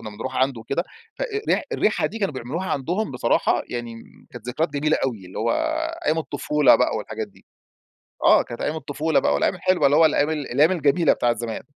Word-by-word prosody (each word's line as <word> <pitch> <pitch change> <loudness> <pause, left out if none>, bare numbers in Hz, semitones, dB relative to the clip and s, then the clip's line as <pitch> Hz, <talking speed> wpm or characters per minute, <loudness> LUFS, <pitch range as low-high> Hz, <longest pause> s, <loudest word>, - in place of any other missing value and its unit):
كنا 110 - -7
بنروح 115 +5 -6
عنده 130 -3 +1
وكده 170 +9 -2 0.3
ف - - -3
أ - - +2
أ 425 -4 -3
ري - - -2
الريحة - - +1
دي 225 - -6
كانوا 195 -9 -1
بيعملوها 140 +10 -4
عندهم، 175 +10 -1
بصراحة 125 -2 +1
يعني 120 -1 -5 0.4
كانت 120 0 -10
ذكريات 155 +7 -1
جميلة 155 +2 +1
أوي، 110 -8 -3
اللي 90 - -8
هو - - 0 0.6
أيام 155 +2 +2
الطفولة 150 -2 +3
بقى - - +1
والحاجات - - -5
دي. - - -23 0.8
آه، - - +6
كانت 120 - -9
أيام 155 - -1
الطفولة 155 0 0
بقى 70 - +1
والأيام - - +1
الحلوة 185 -6 +2
اللي 145 +2 +4
هو 160 0 +7
الأيام 150 0 +1
الأيام 150 +2 +2
الجميلة 155 -1 +3
بتاعة 120 - +1
الزمان. 115 -1 -5
145 Hz, 205 wpm, -23 LUFS, 120-160 Hz, 0.8 s, هو